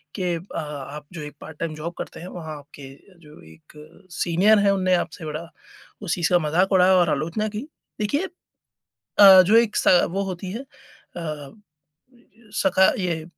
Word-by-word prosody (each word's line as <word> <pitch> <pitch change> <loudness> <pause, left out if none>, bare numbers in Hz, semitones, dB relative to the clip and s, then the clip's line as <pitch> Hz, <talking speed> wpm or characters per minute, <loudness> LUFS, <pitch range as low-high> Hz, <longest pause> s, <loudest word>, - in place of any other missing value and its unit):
कि 180 -3 -1
अ, 170 +4 -8
आप 150 -1 -7
जो 170 - -7
एक 150 0 -9
पार्ट 160 -1 -11
टाइम 165 -2 -3
जॉब 160 +3 -6
करते - - -7
हैं, 175 - -8
वहाँ 160 -4 -7
आपके 140 -1 -13 0.4
जो 150 0 -15
एक 80 - -22 0.5
सीनियर 185 +6 +4
हैं, 200 0 +3
उन्होंने 185 -1 +1
आपसे 165 -2 -4
बड़ा 155 +2 -6 0.5
उस 200 -5 -2
चीज़ 170 -2 0
का 175 - +6
मज़ाक 175 +5 +1
उड़ाया 185 0 +5
और 175 -2 +3
आलोचना 165 +9 -1
की। 235 +8 -5 0.3
देखिए, 250 - 0 0.9
अ, 195 -2 +10
जो 205 +5 +3
एक 230 -2 +3
स - - +2 0.2
वो 195 +3 -2
होती 185 -1 -6
है 230 - -5
अ, 155 - -10 1.1
सका 190 0 +4
ये, 170 -4 -2
175 Hz, 170 wpm, -23 LUFS, 155-195 Hz, 1.1 s, अ